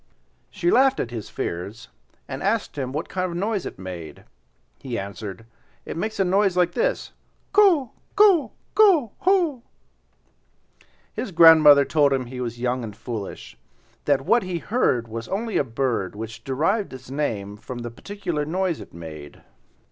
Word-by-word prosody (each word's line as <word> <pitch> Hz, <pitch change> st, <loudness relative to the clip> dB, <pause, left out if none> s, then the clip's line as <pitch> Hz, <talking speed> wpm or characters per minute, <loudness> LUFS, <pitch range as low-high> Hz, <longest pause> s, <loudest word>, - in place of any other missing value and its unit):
She 175 Hz, -, 0 dB
laughed 265 Hz, +1 st, +4 dB
at 120 Hz, -, -3 dB
his 115 Hz, -3 st, -6 dB
fears, 100 Hz, +8 st, -5 dB, 0.4 s
and 135 Hz, 0 st, -6 dB
asked 210 Hz, +2 st, -1 dB
him 130 Hz, -3 st, -3 dB
what 150 Hz, +4 st, -3 dB
kind 185 Hz, -1 st, -2 dB
of 175 Hz, -, -6 dB
a 170 Hz, -, -3 dB
noise 205 Hz, 0 st, -1 dB
it -, -, -9 dB
made. 90 Hz, -4 st, -8 dB, 0.6 s
He 125 Hz, -3 st, -5 dB
answered. 100 Hz, +1 st, -7 dB, 0.4 s
"It -, -, -6 dB
makes 215 Hz, +6 st, -3 dB
a 195 Hz, -, +3 dB
noise 190 Hz, 0 st, +2 dB
like 180 Hz, -1 st, +3 dB
this: -, -, -1 dB, 0.4 s
ko 365 Hz, -, +4 dB, 0.2 s
ko 400 Hz, -6 st, +5 dB, 0.2 s
ko 355 Hz, -, +5 dB
ho!" 350 Hz, -9 st, +2 dB, 1.5 s
His 255 Hz, -, -4 dB
grandmother 160 Hz, -4 st, +8 dB
told 145 Hz, -2 st, +3 dB
him 130 Hz, -2 st, -1 dB
he 125 Hz, +1 st, -7 dB
was 120 Hz, -1 st, -4 dB
young 125 Hz, 0 st, -1 dB
and 105 Hz, -3 st, -7 dB
foolish; 110 Hz, -6 st, -7 dB, 0.5 s
that 140 Hz, -2 st, +2 dB
what 235 Hz, -, +4 dB
he 185 Hz, -3 st, -3 dB
heard 160 Hz, -, 0 dB
was 115 Hz, +1 st, -6 dB
only 220 Hz, +3 st, -2 dB
a -, -, +3 dB
bird 115 Hz, -6 st, -2 dB
which 110 Hz, +1 st, -7 dB
derived 165 Hz, -, 0 dB
its 130 Hz, 0 st, -11 dB
name 110 Hz, -9 st, -2 dB
from 120 Hz, +3 st, -8 dB
the 120 Hz, -, -5 dB
peculiar 175 Hz, -, -4 dB
noise 175 Hz, +2 st, -1 dB
it -, -, -12 dB
made. 80 Hz, -3 st, -10 dB
145 Hz, 165 wpm, -23 LUFS, -, 1.5 s, grandmother